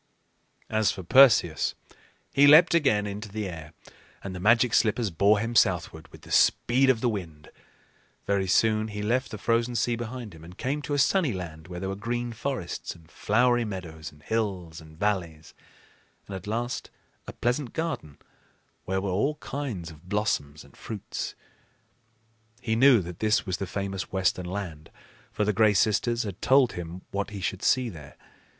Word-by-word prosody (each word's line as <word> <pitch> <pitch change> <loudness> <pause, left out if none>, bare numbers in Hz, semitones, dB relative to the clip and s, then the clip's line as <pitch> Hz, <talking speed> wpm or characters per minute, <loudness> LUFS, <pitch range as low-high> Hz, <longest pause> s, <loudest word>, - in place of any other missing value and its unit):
As 110 -1 +1
for 95 - -7
Perseus, 115 - +5 0.6
he 140 +1 +6
leaped 155 +5 +8
again 120 -11 +3
into 105 +1 -6
the 105 0 -4
air, 80 -4 -8 0.5
and 95 - -5
the 90 - -6
Magic 115 +4 +3
Slippers 110 -1 +2
bore 100 +6 +4
him 115 +3 -2
southward 90 -7 +1
with - - -16
the - - -13
speed 130 +3 +3
of 120 -4 +3
the 125 - +1
wind. 85 -9 -5 0.7
Very 100 -1 0
soon 110 +3 +2
he 105 -1 -5
left 120 +1 0
the 110 - -6
frozen 115 +3 0
sea 120 +1 +1
behind 120 -2 -6
him 80 -1 -13
and 90 +3 -13
came 140 +3 -2
to 145 0 -3
a - - 0
sunny 150 - +2
land, 80 -3 -7
where 90 -1 -7
there 95 - -4
were 95 - -3
green 120 +3 -3
forests 115 -6 -4
and 85 -1 -19
flowery 120 +5 +2
meadows 85 -6 -7
and 75 0 -21
hills 95 -7 -3
and 80 0 -15
valleys, 85 -6 -2 0.7
and 100 - -7
at 95 +1 -8
last 120 +3 -3 0.4
a - - -7
pleasant 120 +2 -1
garden 160 - -4 0.7
where 95 +1 -1
were 100 -1 -2
all 135 +11 0
kinds 125 - -5
of 80 +3 -16
blossoms 85 -8 -1
and - - -19
fruits. 105 -3 -6 1.2
He 110 -3 -1
knew 125 -4 +6
that 85 0 -9
this 110 -1 +2
was 95 -3 -2
the 95 - -4
famous 95 0 -4
Western 95 -1 0
Land, 90 -5 -6 0.4
for 105 - -1
the 105 - +1
Gray 105 +1 +4
Sisters 115 +4 +2
had 100 -4 -7
told 130 -2 +4
him 90 +1 -7
what 100 +3 -2
he 105 -2 -7
should 95 +1 -3
see 130 -1 +2
there. 75 -9 -11
105 Hz, 175 wpm, -27 LUFS, 90-120 Hz, 1.2 s, leaped